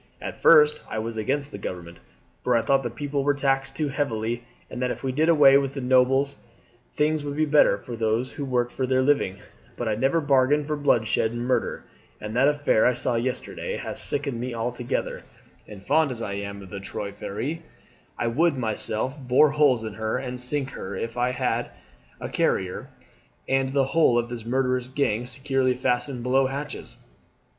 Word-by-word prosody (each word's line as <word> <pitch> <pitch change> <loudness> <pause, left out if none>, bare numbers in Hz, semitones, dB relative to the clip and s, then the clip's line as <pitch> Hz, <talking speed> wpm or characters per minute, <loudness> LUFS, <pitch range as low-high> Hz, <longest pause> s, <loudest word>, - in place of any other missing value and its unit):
At - - -6
first 460 0 +6
I - - -4
was 115 +1 -3
against 140 +6 -2
the - - -7
government, 85 -2 -7 0.5
for 125 - +2
I 115 - +1
thought 135 -1 +3
the 120 - -3
people 140 +3 -3
were 145 0 +2
taxed 135 -1 0
too 150 +1 -1
heavily, 120 -4 -2 0.2
and 125 - -7
that 125 - +1
if - - -5
we 135 - -1
did 155 +5 +1
away 140 -4 +7
with 135 0 -3
the 135 - -3
nobles 130 +2 +3 0.5
things 150 0 0
would 145 -1 -4
be 155 +1 +2
better 145 -9 +4
for 120 +4 -8
those 115 +3 0
who 145 - -6
work 125 -2 0
for 130 - -2
their 130 0 +2
living, 130 -9 +1 0.4
but 120 - -3
I 110 - +1
never 135 +9 +1
bargained 145 0 +3
for 150 +1 -2
bloodshed 115 -5 +1
and 120 0 -3
murder, 130 - -1 0.4
and 105 +1 -6
that 135 +3 +4
affair 145 -6 +3
I 125 - +2
saw 125 0 -1
yesterday 125 +2 -3
has - - -2
sickened 140 -4 0
me 125 0 -4
altogether; 120 +1 -3 0.5
and 100 -2 -11
fond 160 +4 +3
as 125 -3 -5
I 100 - -4
am 100 0 -6
of 95 - -13
the 100 - -5
Trois 100 +1 -5
Freres, 110 +10 -4 0.6
I - - -1
would 145 +6 +2
myself 110 +2 -1
bore 135 +3 +4
holes 140 -6 +3
in 110 -2 -5
her 110 +3 -2
and 125 -1 -5
sink 135 +1 0
her 95 +1 -6
if 115 +4 -4
I 125 0 +1
had - - -2 0.5
Carrier 90 -1 -1 0.6
and 135 0 +1
the 135 -1 +2
whole 135 -4 +3
of 120 0 -1
his 115 -2 -6
murderous 125 0 0
gang 125 -3 -1
securely 130 0 0
fastened 125 0 -1
below 130 +2 +3
hatches. 140 +2 -6
130 Hz, 190 wpm, -25 LUFS, 115-140 Hz, 0.6 s, away